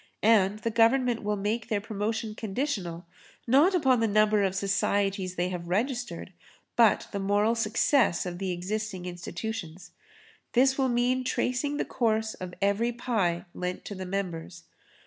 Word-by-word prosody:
And 210 -2 +4
the 225 +2 -3
Government 235 +1 +3
will 210 0 -1
make 215 +3 -2
their 210 -3 +1
promotion 215 +1 -3
conditional, 195 - -3 0.4
not 290 +10 +4
upon 265 -8 +3
the 225 - +2
number 215 0 +3
of 190 -1 0
societies 195 -1 0
they 180 +1 0
have 175 -2 -5
registered, 215 -2 -2 0.4
but 230 -3 +4
the 200 - -3
moral 205 +3 +2
success 230 - +2
of 175 -1 -5
the 195 -1 -2
existing 190 +1 -4
institutions. 180 0 -6 0.6
This 265 +2 +4
will 265 -1 +1
mean 250 +1 +1
tracing 255 +3 -1
the - - -1
course 220 -2 0
of 180 -1 -8
every 205 +4 +2
pie 215 -8 -1
lent 180 0 -4
to - - -5
the 185 -1 -6
members. 180 -3 -4
210 Hz, 150 wpm, -28 LUFS, 185-235 Hz, 0.6 s, And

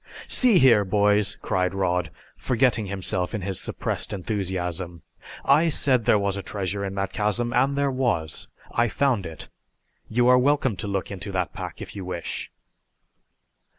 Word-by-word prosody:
"See 245 -6 +5
here, 120 -8 +6
boys," 105 +1 +2
cried 90 0 0
Rod, 90 -4 0 0.3
forgetting 120 -4 +1
himself 95 0 -2
in 105 - -4
his 95 -1 -2
suppressed - - -3
enthusiasm. 90 -4 -3 0.4
"I 155 +4 +4
said 130 -6 +2
there - - +5
was 100 -1 0
a 100 - -4
treasure 100 +1 -3
in 95 0 -4
that 95 -1 -2
chasm, 115 +3 0
and 140 +3 +2
there 140 -1 +1
was. 120 - -1 0.2
I 120 0 +2
found 120 -4 0
it. 80 -1 -9 0.6
You 120 +2 +2
are 125 0 +6
welcome 135 -3 +2
to 105 - -4
look 100 -1 -3
into 100 +1 -6
that 90 -2 -1
pack - - -6
if - - -11
you 100 - -5
wish!" 90 -2 -5
100 Hz, 160 wpm, -24 LUFS, 95-125 Hz, 0.6 s, here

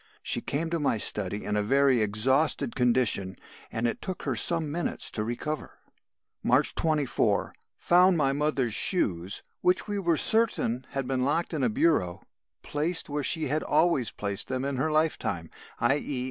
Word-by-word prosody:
She - - 0
came 160 +3 -3
to 170 - -1
my 140 -6 0
study 105 -1 -3
in 105 - -2
a 105 - +1
very 135 +2 +2
exhausted 130 +6 +2
condition, 120 -7 +1 0.4
and 115 +1 -3
it 120 - -2
took 185 - -5
her 135 -4 -2
some 160 +6 +2
minutes 170 +3 -4
to 105 - -3
recover. 135 +7 -5 0.6
"March - - +2
24. 145 -9 0 0.2
Found 180 +1 +4
my 135 -3 +1
mother's 140 -5 -1
shoes, 95 - +1 0.2
which 180 +3 +2
we 205 -1 -2
were 170 -4 +1
certain 175 - +4
had 135 -1 -3
been 130 -1 -1
locked 155 +7 0
up - - -1
in 140 - -2
a 125 - +2
bureau, 105 - 0 0.4
placed 160 +3 -3
where 145 +1 -2
she 160 +3 +1
had 150 +3 -1
always 150 -6 +1
placed 100 -2 -4
them 130 +1 -3
in 140 -1 -3
her 155 +4 -1
lifetime 155 - -1 0.3
_i.e. 135 +2 0
135 Hz, 170 wpm, -27 LUFS, 115-160 Hz, 0.6 s, Found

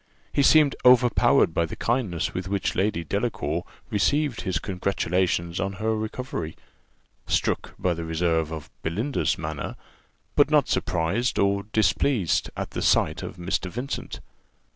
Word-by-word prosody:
He 145 - +3
seemed 145 0 +5
overpowered 125 -8 +5
by 85 0 +1
the - - -7
kindness 115 -9 -1
with 90 0 -4
which 100 0 -1
Lady 95 -3 0
Delacour 85 -4 -2 0.3
received 140 +5 +1
his 95 - -1
congratulations 90 -2 -1
on 100 0 -1
her 110 +3 -1
recovery 110 -6 -4 0.7
struck - - 0
by 90 - +1
the 85 0 -5
reserve 80 -1 0
of 80 -2 -7
Belinda's 110 - -1
manner 75 -2 -5 0.6
but - - +5
not - - +4
surprised, 95 +10 0
or 100 0 +2
displeased, 110 - +2
at - - -4
the - - -4
sight - - +2
of - - -7
Mr. 90 +1 -2
Vincent. 125 +8 -5
95 Hz, 140 wpm, -25 LUFS, 85-115 Hz, 0.7 s, seemed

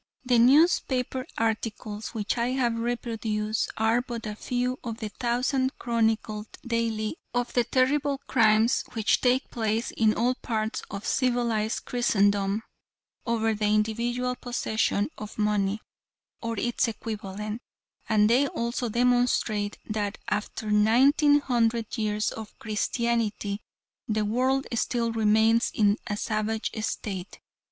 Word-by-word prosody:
The 245 -2 +4
newspaper 260 -1 +3
articles, 220 -1 -2
which 215 -1 -1
I 240 +1 0
have 245 -3 +1
reproduced, 225 -2 -2
are 225 +2 +3
but 240 -3 -6
a 210 - -3
few 250 +3 -2
of 230 -2 -4
the 220 -2 -5
thousands 250 +4 0
chronicled 220 -2 0 0.2
daily 230 +1 -1 0.2
of 245 0 -1
the 245 - +3
terrible 275 +3 +1
crimes 225 0 +3
which 220 -3 +2
take 255 +2 +2
place 225 0 -1
in 220 -1 +2
all 245 +3 +2
parts 220 -3 -3
of 200 0 -6
civilized 240 -4 0
Christendom 205 -3 +1 0.6
over 225 -1 +1
the 210 0 0
individual 235 +4 0
possession 220 -1 -1
of 215 0 -8
money, 210 -1 +1 0.6
or 230 -1 -3
its 240 +2 +1
equivalent, 215 -1 -5 0.5
and 210 -1 +4
they 255 +5 +4
also 235 -1 -2
demonstrate 235 -3 +1
that 210 -1 -2
after 210 0 -2
nineteen 270 +8 +5
hundred 230 -4 0
years 215 -2 0
of 220 -1 -9
Christianity 215 -1 -1 0.5
the 215 -1 0
world 260 +5 +1
still 235 0 0
remains 225 +1 +3
in 205 -1 +3
a 205 -2 -2
savage 215 +1 -1
state. 195 -4 -4
225 Hz, 125 wpm, -27 LUFS, 215-245 Hz, 0.6 s, nineteen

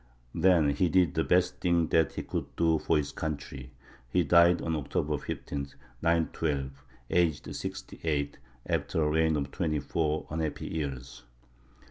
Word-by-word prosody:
Then 85 -6 +4
he 85 +5 +1
did 90 0 +3
the 80 -1 +1
best 90 0 +2
thing 85 -3 +2
that 80 -1 +3
he - - -4
could - - -5
do 80 -2 +2
for 80 - +2
his 70 -1 -1
country: 70 -4 -5 0.4
he 90 +8 +2
died 85 +2 +5
on 80 0 -1
October 75 0 -1
15, 70 -1 -5 0.3
912, 80 -4 0 0.4
aged 85 -4 +1
sixty - - -6
eight, 70 -3 -1 0.3
after 80 - 0
a 75 - +2
reign 80 0 +3
of 70 -2 -2
twenty 80 -5 -1
four 80 +1 -1
unhappy 80 -1 -3
years. 65 -5 -5
80 Hz, 150 wpm, -29 LUFS, 70-85 Hz, 0.4 s, died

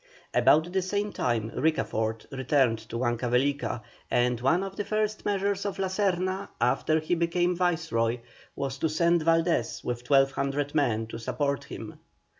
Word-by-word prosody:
About 160 +3 +4
the 190 - +2
same 205 +3 -2
time 115 -2 -1
Ricafort 115 -7 0
returned 130 -3 +2
to - - -6
Huancavelica, 125 +1 0 0.3
and 120 -1 +1
one 160 +9 +2
of 195 0 -6
the 205 - -2
first 215 0 -1
measures 200 -1 0
of 200 -2 -3
La 190 -1 -1
Serna 190 0 0
after 125 +6 +2
he 155 +3 -1
became 175 +1 +1
Viceroy, 160 -10 0 0.4
was 135 -1 -3
to 160 - +1
send 170 +2 +2
Valdés 165 -6 +1
with 120 0 -4
1,200 140 +1 +2
men 115 -7 +1
to 115 +1 -7
support 140 +4 -1
him. - - -8
150 Hz, 150 wpm, -27 LUFS, 125-180 Hz, 0.4 s, About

